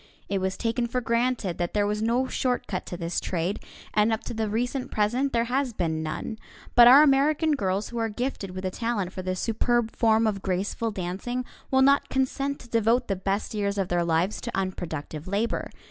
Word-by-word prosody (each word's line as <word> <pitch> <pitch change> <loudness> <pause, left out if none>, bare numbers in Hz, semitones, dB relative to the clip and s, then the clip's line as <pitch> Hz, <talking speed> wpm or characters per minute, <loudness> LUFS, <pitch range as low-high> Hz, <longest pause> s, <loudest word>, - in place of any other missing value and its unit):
It 195 -1 0
was 190 0 -1
taken 235 +1 0
for 250 +2 -1
granted 235 -5 0
that 175 +2 -2
there 205 -1 +3
was 210 +1 -1
no 235 +4 +2
short 250 -1 -1
cut 185 -2 -4
to 175 - -5
this 170 0 -2
trade, 180 +2 -2 0.3
and 210 +1 +3
up 220 - -1
to - - -5
the 220 -1 -1
recent 245 +4 -2
present 240 +6 +1
there 230 -1 +2
has 250 +1 -1
been 160 -5 -1
none. 160 +8 -4 0.3
But 240 0 +9
our 270 +5 +9
American 300 +3 +3
girls 200 -6 0
who 235 - -4
are 225 0 0
gifted 240 -3 -3
with 185 +1 -6
a 185 - -1
talent 210 -5 -2
for 185 - -5
this 185 0 -3
superb 235 0 0
form 225 -1 +3
of 205 -3 0
graceful 195 +5 -1
dancing 205 +6 -3 0.2
will 265 0 +4
not 280 +1 +4
consent 275 +1 -1
to - - -13
devote 230 +1 +2
the 195 - +1
best 195 +3 -2
years 200 -1 -1
of 195 -2 -1
their 175 -1 +1
lives 170 +4 0
to 235 - -4
unproductive 160 -5 -4
labor. 205 +5 -1
220 Hz, 210 wpm, -26 LUFS, 185-245 Hz, 0.3 s, But